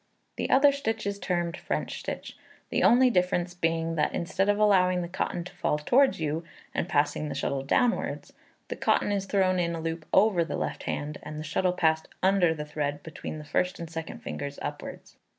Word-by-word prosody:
The - - -2
other 280 +2 +6
stitch 225 -6 -2
is 200 0 -2
termed 175 -3 -1
French - - -3
stitch; - - -6 0.4
the - - +1
only 250 +1 +6
difference 180 -2 +1
being, 165 -1 0
that 150 - +1
instead 190 +3 0
of 205 - +3
allowing 185 -4 +4
the - - -4
cotton 175 -1 -2
to 180 - -11
fall 150 - 0
towards 255 - +3
you, 160 +1 -1 0.3
and 180 - -2
passing 145 0 +1
the - - -4
shuttle 140 -1 -1
downwards, 235 - 0 0.4
the - - -3
cotton - - +1
is 200 -1 0
thrown 185 -2 +2
in 170 -1 0
a - - -4
loop 165 0 -4
over 190 -4 +4
the 165 - -4
left - - -3
hand, 150 +1 -3
and 150 - -7
the 155 - -4
shuttle 180 +4 0
passed 160 -3 +1 0.2
under 190 -3 +4
the 150 -2 -4
thread 145 -1 -3
between 160 -1 -7
the 150 - -9
first 180 +5 0
and 165 -1 -7
second 165 -1 -6
fingers 140 0 -5
upwards. 145 0 -7
170 Hz, 200 wpm, -28 LUFS, 155-195 Hz, 0.4 s, other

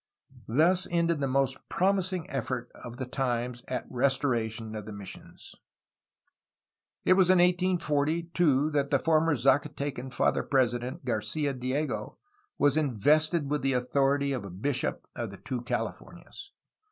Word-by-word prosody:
Thus 170 +10 +3
ended 170 -2 +1
the 140 - 0
most 135 0 +1
promising 185 -2 0
effort 125 -3 -4
of 120 -1 -10
the 130 - -3
times 125 -1 -2
at 125 -2 -3
restoration 120 -4 0
of 105 -1 -6
the - - -6
missions. 100 -2 -10 1.5
It - - +6
was 185 -1 +4
in 185 - +6
1840, 170 -3 +2
too, 150 -3 +3
that 140 -2 0
the 140 - +3
former 160 +1 +2
Zacatecan 135 0 0
Father 120 - +1
President, 130 +2 0
Garcfa 130 +5 -1
Diego, 130 -4 -2 0.4
was 145 +1 +3
invested 150 - +2
with 150 - 0
the 135 0 +1
authority 140 +3 +1
of 100 -7 -5
bishop 140 -3 -1
of 115 -2 -4
the 100 - -10
two 125 +5 -5
Californias. 390 - -6
140 Hz, 135 wpm, -28 LUFS, 125-155 Hz, 1.5 s, It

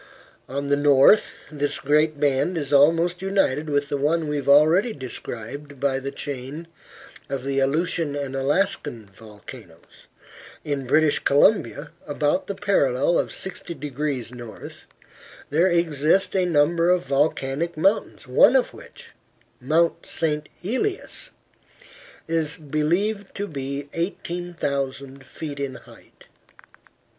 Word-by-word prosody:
On 140 +2 -3
the 140 0 +2
north 145 +7 +5 0.2
this 145 -1 -2
great 150 +1 +2
band 145 +5 +1
is 145 -2 -3
almost 165 +5 +4
united 175 -7 0
with 145 -1 0
the 145 - -1
one 155 +3 0
we 150 - -2
have 140 -1 -3
already 160 +11 +5
described 130 - -8
by 135 -1 0
the 135 +1 -5
chain 140 +4 -6 0.6
of 135 -2 -3
the 135 0 -1
Aleutian 150 +2 0
and 140 -2 -4
Alaska 145 +4 +1
volcanoes. 105 -2 -14 0.6
In 140 -3 -3
British 155 +2 +3
Columbia 150 -1 +2 0.2
about 145 +5 0
the 200 - -4
parallel 170 -7 +2
of - - -2
60 180 -2 -6
degrees 145 -4 -4
N. 120 -3 -9 0.8
there 165 +5 +4
exist 170 +1 +2
a 185 -1 +2
number 165 +2 +3
of 180 -3 +2
volcanic 140 +3 0
mountains, 195 +7 0
one - - +5
of - - +2
which, - - -14 0.5
Mount 160 +6 +1
St. 150 -2 -2
Elias, 375 - -2 1.0
is 160 -2 -1
believed 175 +8 -1
to 205 - -3
be 140 -3 -5
18,000 140 -6 -4
feet 145 0 -7
in 140 -2 -3
height. - - -17
150 Hz, 125 wpm, -23 LUFS, 140-170 Hz, 1.0 s, north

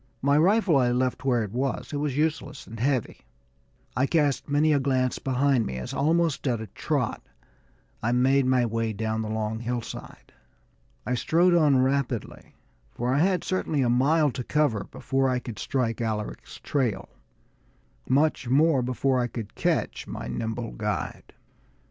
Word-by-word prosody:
My 140 +1 +4
rifle 180 +1 +4
I 125 -2 +3
left 130 +1 -1
where 120 -4 +2
it 105 - -6
was; 130 +5 -2
it - - -1
was 145 -2 -2
useless 150 -2 -2
and 115 0 -10
heavy. 130 -1 0 0.8
I 130 +4 +2
cast 145 -4 +1
many 150 +2 +3
a 145 - +3
glance 130 -2 0
behind 135 -3 +1
me 65 - -4
as, 65 - -6
almost 160 -1 +1
at 120 -3 +1
a 110 - -5
trot, 105 - -2 0.8
I 115 - 0
made 130 +2 +3
my 130 -1 +3
way 115 -1 -1
down 110 +1 -2
the 110 - -4
long 110 0 -2
hillside. 120 0 -6 0.7
I 125 - -1
strode 170 +8 +3
on 145 -6 +4
rapidly, 130 -4 -2 0.3
for 120 - -2
I 140 - +2
had 180 +1 +2
certainly 160 -6 0
a 120 - +2
mile 145 +5 +3
to 125 0 -5
cover 125 -9 +1
before 135 0 -1
I 125 - +1
could 120 -4 -7
strike 120 -4 -1
Alaric's 110 -2 -4
trail, 130 -7 -1 1.0
much 140 -2 +2
more 145 +1 +4
before 130 +1 0
I 120 - +1
could 115 -4 -7
catch - - -1
my - - -6
nimble 115 - -3
guide. - - -4
130 Hz, 160 wpm, -26 LUFS, 115-145 Hz, 1.0 s, My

